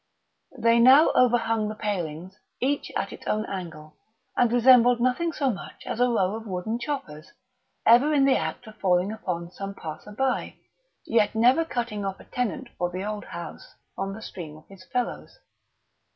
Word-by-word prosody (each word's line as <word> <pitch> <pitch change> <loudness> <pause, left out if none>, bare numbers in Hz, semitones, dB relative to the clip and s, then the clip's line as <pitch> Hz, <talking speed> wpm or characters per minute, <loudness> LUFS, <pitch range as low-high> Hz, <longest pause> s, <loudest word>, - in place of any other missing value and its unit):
They 230 0 +4
now 265 +6 +7
overhung 230 -3 +2
the 215 - -5
palings 185 -3 -4 0.2
each 275 +3 -1
at - - -2
its - - -11
own 215 0 0
angle, 165 -6 -7 0.4
and 245 -2 +3
resembled 245 0 +6
nothing 255 +8 +1
so 280 -4 0
much 195 - -9
as - - -4
a 250 - +4
row 195 -5 +1
of 225 0 -8
wooden 195 +5 -3
choppers, 180 - -5 0.5
ever 245 +6 +6
in 280 -2 +4
the 275 - +4
act 160 0 -3
of 215 -1 -13
falling 180 0 +2
upon 175 -5 -4
some 195 +1 -7
passer 160 +5 -8
by, 265 +4 -1 0.5
yet 225 -1 +2
never 250 +8 +4
cutting 235 -8 -3
off 195 -1 -4
a - - -14
tenant 250 +1 -3
for 175 - 0
the 185 +2 -5
old 210 0 -4
house 170 - -9 0.2
from 195 +1 -4
the 220 - -10
stream 155 -4 -8
of 155 - -19
his 195 -1 -14
fellows. 250 -1 -3
220 Hz, 175 wpm, -26 LUFS, 185-245 Hz, 0.5 s, now